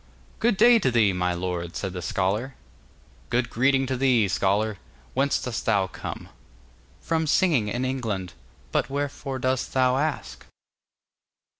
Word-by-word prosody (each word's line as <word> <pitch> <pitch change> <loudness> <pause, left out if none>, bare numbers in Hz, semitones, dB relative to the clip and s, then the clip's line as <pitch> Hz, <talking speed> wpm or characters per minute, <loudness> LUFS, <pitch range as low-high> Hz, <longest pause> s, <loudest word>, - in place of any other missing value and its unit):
'Good 230 -4 +2
day 235 +2 +7
to 135 - +1
thee, 110 -5 +3
my 90 -1 0
lord,' 85 -1 -4
said 95 -3 -3
the 90 - -5
scholar. 105 +10 -1 0.7
'Good 120 0 0
greeting 135 +3 +2
to 130 0 -2
thee, 125 -5 +3
scholar. 100 +2 0 0.3
Whence 140 +2 +1
dost 120 -3 -4
thou 100 -1 +3
come?' 95 - -7 0.7
'From 160 -1 -1
singing 150 - +3
in 120 +4 -2
England; 110 -9 -3 0.4
but - - 0
wherefore 140 -1 -3
dost 130 0 -1
thou 130 -1 +3
ask? 150 +1 -3
125 Hz, 140 wpm, -25 LUFS, 100-135 Hz, 0.7 s, day